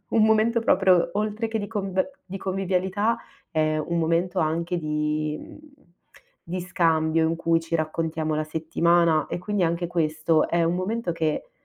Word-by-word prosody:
un 225 Hz, -, +3 dB
momento 220 Hz, +2 st, +3 dB
proprio 185 Hz, -6 st, +3 dB
oltre 215 Hz, +2 st, -1 dB
che 225 Hz, 0 st, -2 dB
di 205 Hz, -, -3 dB
conb 195 Hz, 0 st, -1 dB, 0.2 s
di 195 Hz, -, -6 dB
convivialità, 190 Hz, +3 st, 0 dB, 0.3 s
è 155 Hz, -1 st, +1 dB
un 170 Hz, +2 st, -2 dB
momento 170 Hz, +3 st, 0 dB
anche 165 Hz, +2 st, 0 dB
di 150 Hz, 0 st, -1 dB
mhmm, -, -, -12 dB, 0.9 s
di 180 Hz, +2 st, -3 dB
scambio 165 Hz, -2 st, +1 dB
in 165 Hz, -, 0 dB
cui 165 Hz, 0 st, +2 dB
ci 165 Hz, 0 st, -6 dB
raccontiamo 155 Hz, 0 st, -1 dB
la 155 Hz, -, -1 dB
settimana 165 Hz, 0 st, +2 dB
e -, -, -4 dB
quindi 195 Hz, +1 st, -1 dB
anche 170 Hz, +1 st, -1 dB
questo 155 Hz, -1 st, +1 dB
è 170 Hz, 0 st, +1 dB
un 170 Hz, +1 st, +1 dB
momento 190 Hz, 0 st, -2 dB
che 160 Hz, -, -2 dB
170 Hz, 160 wpm, -25 LUFS, 160-190 Hz, 0.9 s, un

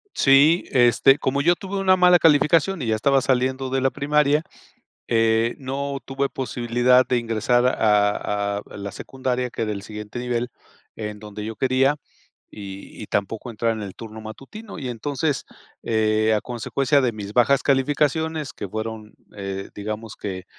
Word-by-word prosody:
Sí, 145 Hz, +5 st, +5 dB
este, 125 Hz, +2 st, +5 dB
como 140 Hz, 0 st, 0 dB
yo 175 Hz, +3 st, +4 dB
tuve 195 Hz, +1 st, -6 dB
una 185 Hz, -1 st, +4 dB
mala 180 Hz, -1 st, +6 dB
calificación 165 Hz, +3 st, +3 dB
y -, -, -3 dB
ya 110 Hz, -, +2 dB
estaba 135 Hz, +5 st, +3 dB
saliendo 130 Hz, 0 st, 0 dB
de 135 Hz, 0 st, 0 dB
la 135 Hz, -, +3 dB
primaria, 150 Hz, +2 st, +1 dB, 0.6 s
eh, 115 Hz, 0 st, +2 dB
no 140 Hz, +1 st, -4 dB
tuve 135 Hz, +1 st, -2 dB
posibilidad 125 Hz, 0 st, +2 dB
de 125 Hz, -, +2 dB
ingresar 120 Hz, +2 st, +1 dB
a 105 Hz, -3 st, +1 dB
a -, -, -4 dB, 0.2 s
la 100 Hz, -1 st, -6 dB
secundaria, 125 Hz, +1 st, -3 dB
que 115 Hz, -, -3 dB
del 105 Hz, -2 st, -4 dB
siguiente 105 Hz, +2 st, -7 dB
nivel 125 Hz, 0 st, -2 dB, 0.5 s
en 105 Hz, -1 st, -5 dB
donde 105 Hz, 0 st, -8 dB
yo 110 Hz, 0 st, -5 dB
quería 135 Hz, +2 st, +2 dB, 0.6 s
y 100 Hz, 0 st, -9 dB
y -, -, -9 dB
tampoco 105 Hz, +4 st, -2 dB
entrar 115 Hz, +1 st, -1 dB
en 110 Hz, -, -6 dB
el 100 Hz, -2 st, -7 dB
turno 110 Hz, -1 st, -9 dB
matutino. 155 Hz, -, -10 dB
Y 130 Hz, -5 st, -5 dB
entonces, 140 Hz, +4 st, -2 dB, 0.4 s
eh, 110 Hz, -1 st, +2 dB
a 105 Hz, -, -1 dB
consecuencia 135 Hz, +4 st, 0 dB
de 120 Hz, -3 st, 0 dB
mis 105 Hz, -1 st, -7 dB
bajas 125 Hz, +3 st, +3 dB
calificaciones 150 Hz, +3 st, 0 dB
que 100 Hz, -, -7 dB
fueron, 110 Hz, 0 st, -6 dB, 0.2 s
eh, 95 Hz, -1 st, -5 dB
digamos 110 Hz, +1 st, -6 dB
que, 95 Hz, -2 st, -6 dB
125 Hz, 160 wpm, -23 LUFS, 110-140 Hz, 0.6 s, mala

